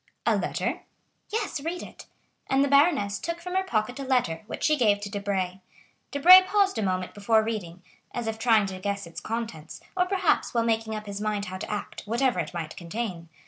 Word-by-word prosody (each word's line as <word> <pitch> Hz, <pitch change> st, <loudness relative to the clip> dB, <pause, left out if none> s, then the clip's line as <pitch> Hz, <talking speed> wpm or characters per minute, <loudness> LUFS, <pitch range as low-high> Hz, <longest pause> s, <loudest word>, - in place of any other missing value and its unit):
"A -, -, +4 dB
letter?" -, -, -2 dB, 0.5 s
"Yes; 420 Hz, -8 st, -2 dB
read 335 Hz, +4 st, -4 dB
it." -, -, -12 dB, 0.4 s
And 270 Hz, +1 st, +3 dB
the -, -, +2 dB
baroness 280 Hz, -, +3 dB
took 335 Hz, 0 st, -4 dB
from 360 Hz, +1 st, -6 dB
her 380 Hz, -, +2 dB
pocket 245 Hz, -, -1 dB
a -, -, -3 dB
letter 245 Hz, -12 st, 0 dB
which -, -, -6 dB
she 305 Hz, +1 st, +4 dB
gave 210 Hz, -7 st, +3 dB
to 205 Hz, -1 st, -6 dB
Debray. 195 Hz, -2 st, -2 dB, 0.5 s
Debray 355 Hz, +6 st, +9 dB
paused 390 Hz, -, +1 dB
a -, -, 0 dB
moment 185 Hz, -2 st, -1 dB
before 220 Hz, +2 st, +2 dB
reading, 185 Hz, -6 st, -5 dB, 0.3 s
as 240 Hz, -, -4 dB
if 225 Hz, 0 st, -3 dB
trying 225 Hz, -3 st, +4 dB
to 190 Hz, -1 st, -6 dB
guess 200 Hz, 0 st, -3 dB
its 170 Hz, -, -9 dB
contents, 220 Hz, -9 st, -5 dB, 0.2 s
or 360 Hz, -1 st, +2 dB
perhaps 370 Hz, -8 st, +1 dB
while 230 Hz, -, +3 dB
making 225 Hz, -1 st, 0 dB
up 215 Hz, 0 st, -6 dB
his 200 Hz, 0 st, -6 dB
mind 210 Hz, -1 st, -1 dB
how 185 Hz, 0 st, -6 dB
to -, -, -6 dB
act, 210 Hz, -1 st, -4 dB
whatever 240 Hz, -1 st, +1 dB
it 160 Hz, -, -3 dB
might 165 Hz, -3 st, -5 dB
contain. 175 Hz, -2 st, -5 dB
220 Hz, 205 wpm, -26 LUFS, 200-280 Hz, 0.5 s, Debray